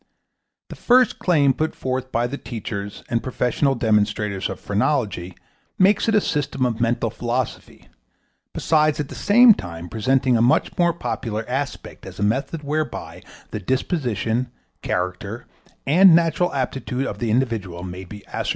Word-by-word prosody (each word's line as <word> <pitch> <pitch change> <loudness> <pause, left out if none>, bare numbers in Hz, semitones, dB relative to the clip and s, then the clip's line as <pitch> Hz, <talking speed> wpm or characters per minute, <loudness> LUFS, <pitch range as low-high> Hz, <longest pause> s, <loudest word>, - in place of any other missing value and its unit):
The - - -8
first 250 0 +3
claim 145 -7 +3
put 155 +4 -2
forth 130 0 -3
by 120 +1 +1
the 140 +4 -4
teachers 105 -3 -6
and 115 -1 0
professional 130 +2 0
demonstrators 105 -3 0
of - - -6
phrenology 100 -5 -1 0.4
makes 200 +4 +3
it 220 - +2
a 210 - +5
system 140 -5 -1
of 115 -2 -2
mental 115 -1 0
philosophy, 120 +1 -4 0.6
besides 155 -1 +2
at 145 - -3
the - - -8
same 230 +3 +6
time 85 - -8
presenting 130 +3 +1
a 115 - +3
much 120 +2 +2
more 175 -1 +3
popular 115 -9 -4
aspect 135 +3 -5
as - - -10
a - - -2
method 135 +9 -1
whereby 155 +2 -3 0.3
the 105 - -3
disposition, 125 - -1 0.3
character 95 +5 -3 0.4
and 175 +4 +7
natural 170 +1 +2
aptitude 130 -1 -2
of - - -5
the 120 - -1
individual 110 -8 -1
may 90 0 -7
be 100 +3 -11
ascertained. - - -4
125 Hz, 150 wpm, -22 LUFS, 105-150 Hz, 0.6 s, and